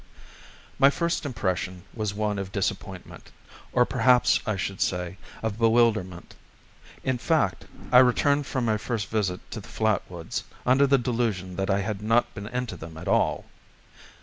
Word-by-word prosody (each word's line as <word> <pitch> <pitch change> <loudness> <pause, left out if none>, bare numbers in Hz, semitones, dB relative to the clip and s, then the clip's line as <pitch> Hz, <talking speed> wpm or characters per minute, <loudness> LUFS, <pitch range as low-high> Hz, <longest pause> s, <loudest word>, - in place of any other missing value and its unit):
My 135 0 +7
first 170 0 -1
impression 95 -6 -2
was 105 -3 -2
one 105 0 -1
of 95 -1 -5
disappointment, 95 -2 -4 0.4
or 125 -1 +4
perhaps 125 0 +4
I 110 - +1
should 100 0 -3
rather - - -9
say, 90 0 -3 0.3
of 110 -1 -2
bewilderment. 110 -6 +2 0.7
In 130 -2 0
fact, 125 - +1 0.3
I 125 - +9
returned 140 +3 +3
from 130 -3 -1
my 110 -2 +2
first 110 -1 -3
visit 95 -5 -1
to 115 - -5
the 100 - -12
flat 110 -3 +1
woods 85 -2 -5 0.2
under 130 +3 +5
the 140 0 +5
delusion 115 -7 -1
that 95 +1 -1
I 100 0 +2
had 105 0 -3
not 115 +3 +2
been 100 0 -7
into 125 0 -3
them 80 0 -10
at 85 - -8
all. - - +1
110 Hz, 165 wpm, -26 LUFS, 95-125 Hz, 0.7 s, I